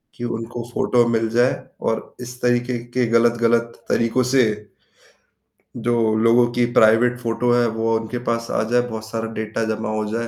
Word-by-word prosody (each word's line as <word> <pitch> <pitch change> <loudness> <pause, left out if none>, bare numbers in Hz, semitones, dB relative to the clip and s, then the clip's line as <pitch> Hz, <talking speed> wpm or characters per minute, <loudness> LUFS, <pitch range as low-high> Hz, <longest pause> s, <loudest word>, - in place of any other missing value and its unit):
कि 120 - -9
उनको 115 +1 -6
फ़ोटो 120 -1 +2
मिल 115 -1 +1
जाए 120 +3 +2 0.4
और 110 - -4
इस 125 0 -9
तरीके 120 0 +1 0.2
के 125 -1 +2
गलत-गलत 115 0 +2 0.2
तरीकों 115 +2 +1
से, 130 -2 +5 1.3
जो 115 -2 +1
लोगों 115 +2 +4
की 120 - +3
प्राइवेट 115 +3 +4
फ़ोटो 120 0 -1
है 120 0 +3
वो 115 0 +1
उनके 115 +2 -5
पास 115 0 -1
आ - - 0
जाए 120 0 +4
बहुत 110 -1 -6
सारा 115 0 -4
डेटा 110 +1 -3
जमा 110 - -5
हो 110 0 -2
जाए। 115 +1 -2
115 Hz, 170 wpm, -21 LUFS, 115-120 Hz, 1.3 s, से